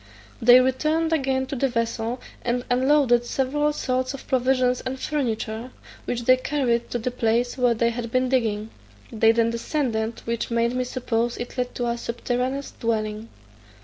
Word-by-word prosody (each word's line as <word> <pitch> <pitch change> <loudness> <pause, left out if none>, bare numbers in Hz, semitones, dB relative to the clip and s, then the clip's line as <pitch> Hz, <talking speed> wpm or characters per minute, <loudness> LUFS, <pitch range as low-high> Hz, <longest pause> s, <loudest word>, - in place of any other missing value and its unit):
They 245 +2 +8
returned 305 +6 +1
again 265 -3 +1
to 265 - -5
the 270 +1 +1
vessel, 230 0 -2 0.2
and 245 0 -1
unloaded 255 -1 +4
several 275 +4 0
sorts 255 -2 -1
of 275 - -11
provisions 255 -1 +2
and 260 +1 -5
furniture, 235 -5 -2 0.4
which 240 0 -2
they 255 +2 +5
carried 255 -4 0
to - - -1
the 240 +2 -2
place 240 0 0
where 245 -2 +2
they 235 +1 +2
had 235 0 -4
been 255 +2 +1
digging: 225 -4 0 0.4
they 225 -1 +4
then 230 0 +2
descended, 230 -2 -2
which 230 0 -2
made 235 0 +1
me 255 0 -1
suppose 240 -2 -1
it 240 - -6
led 250 -1 -3
to 245 - -2
a 235 0 -1
subterraneous 250 +4 -2
dwelling. 215 -1 -2
245 Hz, 165 wpm, -24 LUFS, 230-260 Hz, 0.4 s, They